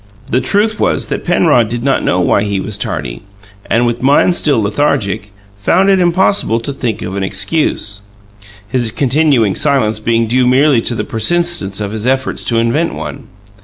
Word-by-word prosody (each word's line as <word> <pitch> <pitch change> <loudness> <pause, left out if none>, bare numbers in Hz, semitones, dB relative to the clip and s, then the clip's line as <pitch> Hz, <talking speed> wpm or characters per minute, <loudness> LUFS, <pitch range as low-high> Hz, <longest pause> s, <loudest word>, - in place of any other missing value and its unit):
The 125 - +2
truth 210 - +1
was - - 0
that - - -3
Penrod 150 -10 +2
did 120 0 -4
not 135 - +1
know 90 - +1
why 90 - +2
he 100 -1 -1
was 105 +2 -3
tardy, - - -4 0.5
and, 120 +1 +2
with 120 0 -2
mind 145 +6 +3
still 145 -7 +1
lethargic, 105 -3 -1 0.3
found 185 - +2
it 190 - +3
impossible 175 - +2
to 140 +4 -5
think 120 -5 -3
of 95 - -5
an 100 - -2
excuse 100 +1 -1 0.7
his 120 +1 -1
continuing 135 -5 +2
silence 130 -8 +1
being 115 +1 +1
due 125 +2 +1
merely 130 0 +3
to 120 - -3
the - - -2
persistence 115 - 0
of 100 -1 -3
his 110 +2 -4
efforts 130 +1 -1
to 115 - 0
invent 120 +9 0
one. 135 -4 -7
120 Hz, 175 wpm, -14 LUFS, 105-150 Hz, 0.7 s, mind